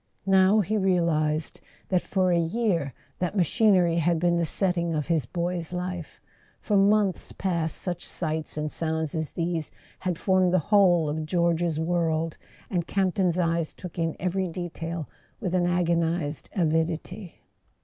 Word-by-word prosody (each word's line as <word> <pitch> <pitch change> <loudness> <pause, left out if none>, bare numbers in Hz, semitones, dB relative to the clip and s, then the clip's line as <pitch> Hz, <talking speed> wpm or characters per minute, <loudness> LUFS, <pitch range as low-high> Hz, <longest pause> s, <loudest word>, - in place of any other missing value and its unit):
Now 195 +2 +5
he 215 +3 -1
realized 165 -5 +1 0.3
that 185 -2 +2
for 185 -2 +1
a 170 - +3
year 170 - 0 0.2
that 180 +3 -2
machinery 180 -1 +3
had 170 0 +2
been 175 0 +2
the 170 -1 +1
setting 170 -2 0
of 150 -2 -1
his 165 -4 0
boy's 175 -1 -2
life; 180 -2 -5 0.4
for 210 - -1
months 200 -1 +2
past 170 -4 -1
such 180 -2 -5
sights 155 -2 -3
and 150 0 -2
sounds 160 -2 -2
as 160 -2 -2
these 165 -2 -2 0.3
had 180 -3 -2
formed 185 -1 +2
the 185 +4 -1
whole 175 -6 +5
of 155 +1 -3
George's 170 -1 +1
world; 165 -1 0 0.3
and 170 -2 -2
Camp 190 -2 +1
ton's 180 -3 +1
eyes 165 -2 0
took 180 -2 -8
in 165 -1 0
every 185 +1 -1
detail 170 -2 -5 0.3
with 185 -5 -3
an 175 -1 +2
agonized 170 -4 0
avidity. 170 +2 -1
170 Hz, 150 wpm, -26 LUFS, 160-185 Hz, 0.4 s, Now